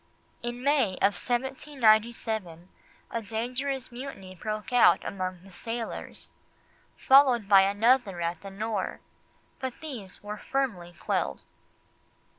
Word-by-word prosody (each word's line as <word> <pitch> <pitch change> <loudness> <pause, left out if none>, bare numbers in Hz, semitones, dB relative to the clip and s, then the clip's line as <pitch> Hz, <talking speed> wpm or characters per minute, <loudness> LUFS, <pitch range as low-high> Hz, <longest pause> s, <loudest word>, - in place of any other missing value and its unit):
In 240 +1 -5
May 280 -8 +3
of 200 +2 +3
1797 230 - 0 0.4
a 230 - -2
dangerous 250 +5 -3
mutiny 240 -7 -8
broke 215 +5 -5
out 245 - +6
among 185 -2 -4
the 195 - -15
sailors, 230 +5 -6 0.7
followed 260 -5 +5
by 195 -1 +8
another 205 0 +3
at 170 0 -2
the 195 - -8
Nore, 205 0 -3 0.6
but 260 -2 -3
these 240 - -8
were 210 0 -6
firmly 200 -11 -2
quelled. - - -1
220 Hz, 110 wpm, -28 LUFS, 195-255 Hz, 0.7 s, by